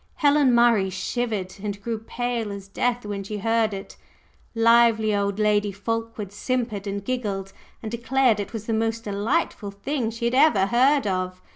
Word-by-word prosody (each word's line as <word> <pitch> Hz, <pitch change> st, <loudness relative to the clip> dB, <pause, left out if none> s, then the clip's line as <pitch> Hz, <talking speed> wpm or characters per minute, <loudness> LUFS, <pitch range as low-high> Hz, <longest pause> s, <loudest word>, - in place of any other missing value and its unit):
Helen 285 Hz, -4 st, +4 dB
Murray 235 Hz, -5 st, +4 dB
shivered 190 Hz, 0 st, -3 dB
and 205 Hz, -1 st, -4 dB
grew 225 Hz, +2 st, -3 dB
pale 235 Hz, -1 st, -3 dB
as 200 Hz, -1 st, -8 dB
death 245 Hz, +3 st, -1 dB
when 205 Hz, -1 st, -4 dB
she 210 Hz, +2 st, -5 dB
heard 225 Hz, +1 st, +1 dB
it; 195 Hz, -1 st, -8 dB, 0.6 s
lively 230 Hz, -2 st, +4 dB
old 200 Hz, 0 st, -1 dB
Lady 210 Hz, -1 st, +2 dB
Fulkeward 225 Hz, 0 st, -4 dB
simpered 215 Hz, -2 st, -2 dB
and 200 Hz, 0 st, -4 dB
giggled, 205 Hz, -7 st, -3 dB, 0.3 s
and 220 Hz, -, -5 dB
declared 235 Hz, -1 st, +2 dB
it 205 Hz, -, -4 dB
was 220 Hz, -2 st, -6 dB
"the 225 Hz, -, -1 dB
most 225 Hz, +1 st, -1 dB
delightful 210 Hz, +2 st, -1 dB
thing 225 Hz, +5 st, -3 dB
she 230 Hz, +1 st, -5 dB
had 235 Hz, -, +1 dB
ever 255 Hz, -8 st, +5 dB
heard 260 Hz, +5 st, +3 dB
of!" 185 Hz, -1 st, -2 dB
220 Hz, 165 wpm, -24 LUFS, 200-235 Hz, 0.6 s, ever